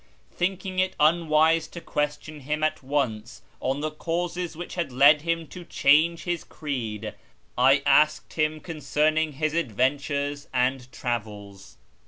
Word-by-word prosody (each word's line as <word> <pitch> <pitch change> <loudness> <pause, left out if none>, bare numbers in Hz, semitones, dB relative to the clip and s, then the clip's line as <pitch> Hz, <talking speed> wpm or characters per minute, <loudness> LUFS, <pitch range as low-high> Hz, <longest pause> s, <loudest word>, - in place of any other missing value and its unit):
Thinking 185 +1 -2
it 185 0 +1
unwise 160 0 +3
to 170 - -9
question 150 0 -3
him 150 +3 -3
at 155 - 0
once 130 -5 -2 0.2
on 135 +2 -2
the 155 0 -2
causes 170 +1 -3
which 175 - -7
had 170 -6 -3
led 140 +4 +6
him 165 0 -1
to 180 - -9
change 165 +1 +3
his 175 -2 -2
creed, 115 -8 -5 0.4
I 135 +3 +4
asked 150 +1 +3
him! 155 0 +1
I - - -11
concerning 155 0 0
his 155 +2 -1
adventures 145 +1 -1
and 125 0 0
travels. 105 -5 -6
150 Hz, 140 wpm, -25 LUFS, 130-165 Hz, 0.4 s, led